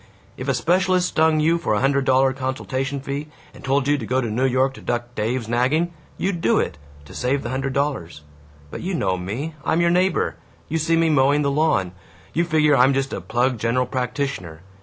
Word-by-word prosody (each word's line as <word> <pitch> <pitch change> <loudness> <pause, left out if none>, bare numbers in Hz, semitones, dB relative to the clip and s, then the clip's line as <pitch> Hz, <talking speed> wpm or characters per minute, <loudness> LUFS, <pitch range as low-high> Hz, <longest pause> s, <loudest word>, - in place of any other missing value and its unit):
If 130 - -7
a 135 - +1
specialist 180 +3 +2
stung 160 0 +3
you 165 +2 +2
for 110 - 0
a - - +1
hundred 140 0 +2
dollar 130 0 +3
consultation 130 +1 -3
fee 140 +2 -4 0.3
and - - -14
told 135 0 +1
you 145 0 +2
to 115 - -5
go 130 +1 +1
to 120 -4 -2
New 125 +5 +1
York 130 +1 +1
to - - -12
duck 120 0 -3
Dave's 115 +2 -2
nagging, 135 +9 +1 0.2
you'd 185 -3 -2
do 115 - +3
it, - - -3 0.3
to - - -13
save 135 +2 -1
the 120 - -4
hundred 135 +1 -2
dollars! 130 - -2 0.5
But - - -6
you 185 +1 -2
know 95 - 0
me 110 - -4
I'm 160 - +1
your 170 0 +3
neighbor 185 +2 +1 0.3
you 160 +1 -1
see 165 +1 +2
me 165 -1 +3
mowing 145 +1 +3
the 140 - +1
lawn 140 - +1 0.4
you 170 - +2
figure 150 -3 +3
I'm 130 +1 +4
just 135 0 -1
a - - -4
plug 120 +1 0
general 115 +3 +1
practitioner. 125 - -3
135 Hz, 210 wpm, -22 LUFS, 125-155 Hz, 0.5 s, I'm